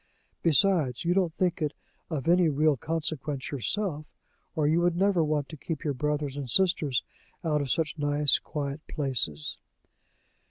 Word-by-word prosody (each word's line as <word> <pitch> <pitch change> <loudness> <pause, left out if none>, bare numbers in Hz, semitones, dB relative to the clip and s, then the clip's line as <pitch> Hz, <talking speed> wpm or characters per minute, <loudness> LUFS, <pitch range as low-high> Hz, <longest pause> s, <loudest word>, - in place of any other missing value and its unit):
'Besides, 165 -6 +3
you 175 - +3
don't 180 -4 +1
think 180 -2 0
it 150 -1 0 0.4
of 155 -3 -3
any 175 -1 +5
real 150 +1 +3
consequence 150 -1 -3
yourself, 150 - -2 0.5
or 155 - +1
you 160 +3 +3
would 175 -1 +2
never 190 -2 +3
want 150 -2 0
to 160 - -7
keep 155 0 -5
your 145 - 0
brothers 150 +1 -1
and 140 -3 -5
sisters 150 -4 +2 0.4
out 150 -3 +1
of 140 - -3
such 155 +2 0
nice 145 -1 +3
quiet 145 0 -4
places!' 120 - -2
150 Hz, 155 wpm, -28 LUFS, 140-170 Hz, 0.5 s, any